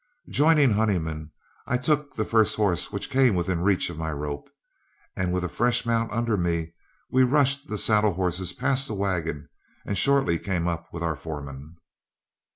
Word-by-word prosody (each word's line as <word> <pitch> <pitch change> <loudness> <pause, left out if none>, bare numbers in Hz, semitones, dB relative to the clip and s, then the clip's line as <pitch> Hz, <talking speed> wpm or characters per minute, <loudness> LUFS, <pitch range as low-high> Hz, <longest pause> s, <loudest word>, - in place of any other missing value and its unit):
Joining 150 -2 +4
Honeyman, 85 -8 -1 0.4
I 125 - +1
took 145 +3 -1
the 110 - -1
first 110 -1 +3
horse 100 -5 0
which 100 -1 -5
came 130 -5 +4
within 90 0 -1
reach 95 0 +2
of 80 - -9
my 80 -1 -2
rope, 75 -1 -5 0.7
and 90 -1 -1
with 90 0 -1
a - - -1
fresh 120 +8 +1
mount 115 -1 0
under 115 -1 0
me, 85 -3 -1 0.4
we 130 - +4
rushed 140 +2 +2
the 105 - -4
saddle 105 -1 +3
horses 90 0 -1
past 135 +6 0
the 110 - -4
wagon 85 -7 -2 0.4
and 100 - -2
shortly 135 -5 +2
came 90 -3 -2
up 85 -1 -4
with 85 0 -6
our 80 -2 -1
foreman. 75 0 -8
95 Hz, 170 wpm, -25 LUFS, 85-120 Hz, 0.7 s, Joining